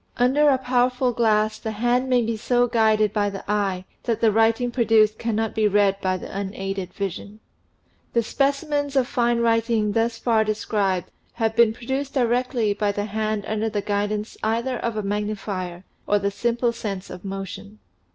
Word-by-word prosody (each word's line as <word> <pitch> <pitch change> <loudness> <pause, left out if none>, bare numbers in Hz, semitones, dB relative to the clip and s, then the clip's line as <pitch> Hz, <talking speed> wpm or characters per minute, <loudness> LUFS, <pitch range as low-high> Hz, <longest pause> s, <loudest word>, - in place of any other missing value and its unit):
Under 270 +5 +4
a 270 - +4
powerful 250 0 +1
glass 215 -2 +2
the 220 - -4
hand 245 +4 +1
may 250 -2 +3
be 230 0 -1
so 245 +2 +2
guided 220 -3 +2
by 205 -1 +1
the 195 -1 -7
eye 195 -3 -1 0.2
that 230 -3 -1
the 225 -2 +4
writing 225 +3 +2
produced 220 -3 +3
cannot 225 -1 -1
be 215 -1 +2
read 200 -1 +2
by 185 0 0
the 185 - -9
unaided 195 -1 -4
vision. 200 +2 -5 0.7
The 235 - +2
specimens 285 +3 0
of 265 -2 +3
fine 240 -2 +1
writing 230 -2 +2
thus 230 +2 0
far 225 -2 +2
described 210 -4 -1 0.2
have 225 -2 -1
been 235 -1 +5
produced 265 +5 -4
directly 245 -3 +1
by 205 0 0
the 205 0 -3
hand 215 0 -2
under 220 +1 -1
the 205 -2 -2
guidance 210 +1 -2
either 235 +3 -1
of 230 -2 -3
a 215 - -1
magnifier 200 -3 -3 0.2
or 205 - +3
the 200 0 -1
simple 235 +3 0
sense 200 -4 -5
of 180 - -9
motion. 195 - -7
220 Hz, 170 wpm, -23 LUFS, 205-240 Hz, 0.7 s, been